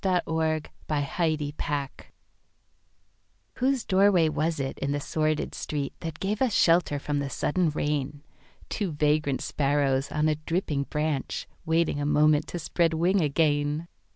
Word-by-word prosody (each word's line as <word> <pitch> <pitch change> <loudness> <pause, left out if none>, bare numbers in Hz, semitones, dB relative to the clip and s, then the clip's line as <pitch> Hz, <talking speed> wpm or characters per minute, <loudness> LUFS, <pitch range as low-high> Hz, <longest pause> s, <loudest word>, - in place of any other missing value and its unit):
The 185 -2 +2
Rainbow 160 -1 0 0.3
Vine 155 +2 0
Colby 145 -1 -4 2.0
WHOSE 260 -1 +1
doorway 190 -4 +4
was 155 +1 -1
it, 135 -1 -3
in 140 +1 -1
the 145 - -1
sordid 155 +1 -1
street, 145 -2 -3
That 160 -1 -6
gave 205 +4 -2
us 255 -5 +2
shelter 165 -3 +4
from 145 0 -2
the 140 -1 -2
sudden 170 +4 0
rain,—Two 150 +5 -4
vagrant 150 -2 +1
sparrows 140 -1 0
on 150 0 +1
a 155 - +3
dripping 155 -3 -1
branch, 150 -2 -2 0.2
Waiting 160 -2 +1
a 145 - -1
moment 150 0 +3
to - - -5
spread 165 0 +1
wing 180 +4 +2
again? 150 +1 +1
155 Hz, 140 wpm, -27 LUFS, 145-170 Hz, 2.0 s, doorway